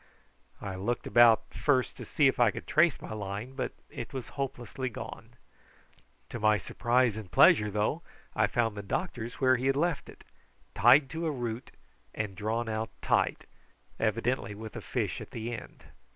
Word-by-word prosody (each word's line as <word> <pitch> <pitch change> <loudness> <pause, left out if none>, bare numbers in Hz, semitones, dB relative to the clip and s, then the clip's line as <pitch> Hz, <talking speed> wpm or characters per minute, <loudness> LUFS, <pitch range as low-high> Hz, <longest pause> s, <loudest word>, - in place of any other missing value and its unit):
I 100 -1 -4
looked 115 +6 -2
about 120 -2 +5
first 130 -4 +1
to - - -7
see 150 - +2
if 135 - +3
I 120 -2 +6
could - - -6
trace 160 -2 +3
my - - -7
line, 105 +4 -5
but 135 - -3 0.2
it 120 - -7
was 130 -4 -5
hopelessly 130 -1 -4
gone. 115 - -9 0.9
To 120 - -5
my 105 0 +4
surprise 120 +3 +1
and 110 -4 -7
pleasure, 105 0 +6
though, 105 - 0 0.3
I - - +3
found 115 -3 0
the 100 - -4
doctor's 115 - -3
where 130 -1 +3
he 130 +3 -1
had 135 - +3
left 165 0 0
it, - - -14 0.5
tied 130 +8 +6
to 165 0 -2
a - - +1
root 120 -3 -4 0.5
and 105 -3 -3
drawn 110 +3 -2
out 110 0 -2
tight, - - +1 0.5
evidently 115 0 0
with 110 +1 -9
a - - -5
fish - - -2
at - - -9
the 115 +1 -5
end. 115 - -9
120 Hz, 175 wpm, -30 LUFS, 110-130 Hz, 0.9 s, I